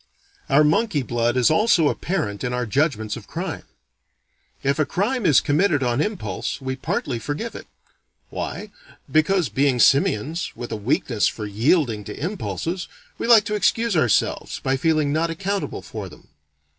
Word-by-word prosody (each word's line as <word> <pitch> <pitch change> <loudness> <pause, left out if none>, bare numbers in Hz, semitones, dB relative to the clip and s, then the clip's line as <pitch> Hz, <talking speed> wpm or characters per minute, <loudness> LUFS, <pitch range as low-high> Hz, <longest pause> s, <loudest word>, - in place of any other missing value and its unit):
Our 140 +3 +5
monkey 155 - +2
blood 120 0 0
is 125 +3 +4
also 200 -3 +4
apparent 145 - -2
in 125 - -2
our 125 0 -1
judgments 110 -4 0
of - - -10
crime. - - -5 1.0
If 140 +2 +1
a - - +5
crime 215 +2 0
is 145 -5 +5
committed 155 -1 +2
on 120 +2 +1
impulse, 210 -5 -3
we 130 -1 -3
partly 130 -1 -2
forgive 150 - -4
it. - - -9 0.6
Why? - - -5 0.4
Because, 165 +2 +3
being 135 +4 +2
simians, 140 +5 +2
with 120 - -7
a - - -1
weakness 110 0 0
for 110 - -4
yielding 115 - +1
to - - -8
impulses, 175 0 -3 0.3
we - - -2
like 230 -3 +7
to 210 - -3
excuse 225 +1 +1
ourselves 125 -10 +1
by 135 0 +1
feeling 150 0 +1
not 165 +2 +1
accountable 195 +4 -3
for 105 -4 -7
them. 75 - -17
145 Hz, 155 wpm, -22 LUFS, 120-180 Hz, 1.0 s, like